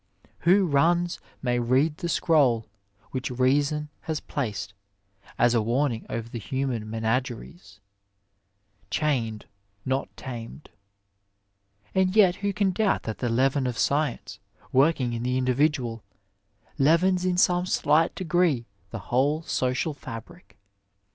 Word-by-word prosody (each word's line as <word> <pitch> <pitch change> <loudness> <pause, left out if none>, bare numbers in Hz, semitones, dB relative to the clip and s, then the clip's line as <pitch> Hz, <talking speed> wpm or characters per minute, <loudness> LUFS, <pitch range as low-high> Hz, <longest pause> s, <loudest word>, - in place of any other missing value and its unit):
(Marion - - -44
Crawford.) 170 - -1
Who - - +2
runs 170 +3 +2 0.2
may 120 -1 +1
read 130 +6 +2
the 170 - -4
scroll 135 -10 +3 0.5
which 130 +2 -3
reason 140 +4 +1 0.2
has 155 -1 0
placed 105 -7 -4 0.6
as 120 0 +4
a 115 - +3
warning 120 +1 -1
over 115 0 -4
the 115 0 -6
human 125 -2 -3
menageries: 115 - -3 0.6
" 100 0 -48 0.3
chained, 115 -8 -1 0.4
not 130 +1 -1
tamed." 120 +3 -8 1.2
And 190 0 +2
yet 190 -5 +5
who 200 0 -1
can 200 -1 +1
doubt 205 +1 +1
that 110 - -5
the 120 - -1
leaven 130 +3 +2
of 120 -2 -3
science, 150 +1 -1 0.3
working 135 -3 +3
in 115 - -3
the 125 +1 0
individual, 130 -2 0 0.8
leavens 175 +6 +3
in 180 -1 0
some 180 0 +3
slight 165 -2 +2
degree 175 -8 +1 0.2
the 115 - -6 0.2
whole 145 +5 +2
social 130 +2 -1
fabric. 145 - -10
135 Hz, 130 wpm, -26 LUFS, 120-165 Hz, 1.2 s, yet